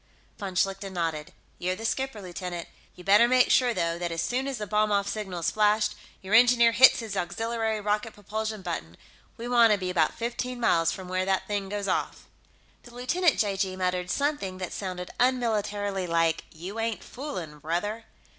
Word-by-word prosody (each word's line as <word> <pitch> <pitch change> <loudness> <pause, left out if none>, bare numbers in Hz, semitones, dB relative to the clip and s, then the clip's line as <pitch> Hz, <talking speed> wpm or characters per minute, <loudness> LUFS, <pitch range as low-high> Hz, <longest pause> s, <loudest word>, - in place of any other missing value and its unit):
Von 195 -3 -5
Schlichten 195 +1 0
nodded. 165 -3 -2 0.3
"You're 185 +1 -1
the 225 +4 -7
skipper, 265 -4 -2
lieutenant. 180 -1 -6 0.3
You'd 180 - -13
better 205 +4 +6
make 255 0 +4
sure, 250 -2 +4
though, 170 -6 -1
that 175 -1 -2
as 165 - -3
soon 250 +10 -1
as 270 -2 -3
the 210 - -4
bomb 210 +1 +1
off 200 -1 +2
signal 195 -4 -4
is - - +1
flashed, 210 0 +2 0.3
your 190 +2 -4
engineer 235 0 +6
hits 255 +2 +7
his 220 -3 -5
auxiliary 225 +4 -1
rocket 210 +2 -1
propulsion 215 0 -4
button. 80 - -5 0.4
We 235 - -6
want 235 -3 +5
to - - +2
be 185 -2 -3
about 165 -4 +2
fifteen 240 +1 -3
miles 165 -8 +3
from 190 -1 -7
where 185 0 -1
that 190 0 0
thing 200 -2 -3
goes 205 0 -3
off." - - -2 0.6
The 240 0 -15
lieutenant 320 +7 +2
(j.g.) 195 -2 0
muttered 180 -1 -1
something 280 -8 -1
that 185 -2 -5
sounded 180 -2 -5
unmilitarily 210 -6 0
like, 165 -1 +1
"You 185 +7 -7
ain't 225 -1 -2
foolin', 180 - -7
brother!" 205 +9 -3
205 Hz, 185 wpm, -27 LUFS, 180-230 Hz, 0.6 s, hits